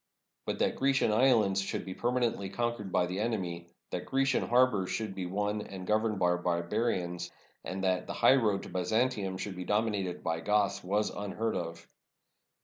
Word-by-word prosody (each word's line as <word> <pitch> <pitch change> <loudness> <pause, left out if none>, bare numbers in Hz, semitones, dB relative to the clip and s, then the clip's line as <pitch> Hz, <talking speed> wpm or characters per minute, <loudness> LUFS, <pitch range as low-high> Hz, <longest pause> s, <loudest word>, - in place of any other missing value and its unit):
But - - -1
that - - +1
Grecian 135 -4 +2
islands 110 -5 +4
should 95 - -3
be 95 - -5
permanently 120 -4 0
conquered 120 -3 -2
by 90 0 +3
the 90 +2 -3
enemy, 90 -7 -2 0.2
that 90 - -4
Grecian 135 0 +1
harbors 120 -6 +3
should 110 -3 -2
be 95 -2 -4
won 105 +3 -1
and 95 -2 -8
governed 110 +1 +1
by 90 -1 +2
barbarians, 90 0 -1 0.3
and 95 +1 -4
that 95 -1 +1
the - - -4
highroad 110 -7 +4
to - - -8
Byzantium 100 +1 0
should 95 0 -5
be 90 - -5
dominated 105 -2 -1
by 80 0 -1
Goths, 105 +2 +1
was 105 +3 0
unheard 110 +2 -3
of. 85 -2 -5
100 Hz, 165 wpm, -31 LUFS, 90-115 Hz, 0.3 s, islands